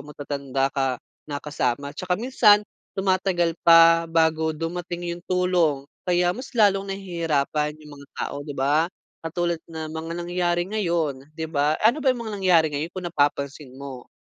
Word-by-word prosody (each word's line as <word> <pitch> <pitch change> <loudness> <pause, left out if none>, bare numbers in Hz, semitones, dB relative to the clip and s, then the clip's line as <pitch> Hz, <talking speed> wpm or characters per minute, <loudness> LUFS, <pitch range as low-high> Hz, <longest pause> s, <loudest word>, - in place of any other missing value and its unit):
matatanda 140 -2 -2
ka 135 -2 0 0.3
na 145 - -3
kasama 140 -1 -2
at - - -24
tsaka 180 -1 0
minsan 215 -3 +4 0.3
tumatagal 185 -3 +1
pa 165 0 +6
bago 160 -1 +1
dumating 175 +1 -4
yung 170 0 -8
tulong, 180 -6 +1 0.2
kaya 175 0 +3
mas 255 +7 -8
lalong 200 -3 +3
nahihirapan 160 -6 -1
yung 150 -2 -13
mga 140 - -13
tao, 140 - -4
di 145 -1 -7
ba? 150 +5 +2 0.3
Katulad 170 0 -2
na 160 -1 -6
mga 160 +1 -5
nangyari 175 0 0
ngayon, 170 -9 -2
di 160 - -3
ba? 150 -1 +1
Ano 240 +8 +4
ba 275 - +2
yung 245 -2 0
mga 215 - -5
nangyari 175 -4 +5
ngayon 150 +4 -3
kung 185 - -4
napapansin 145 -4 -1
mo? 135 -2 -9
165 Hz, 160 wpm, -24 LUFS, 145-180 Hz, 0.3 s, pa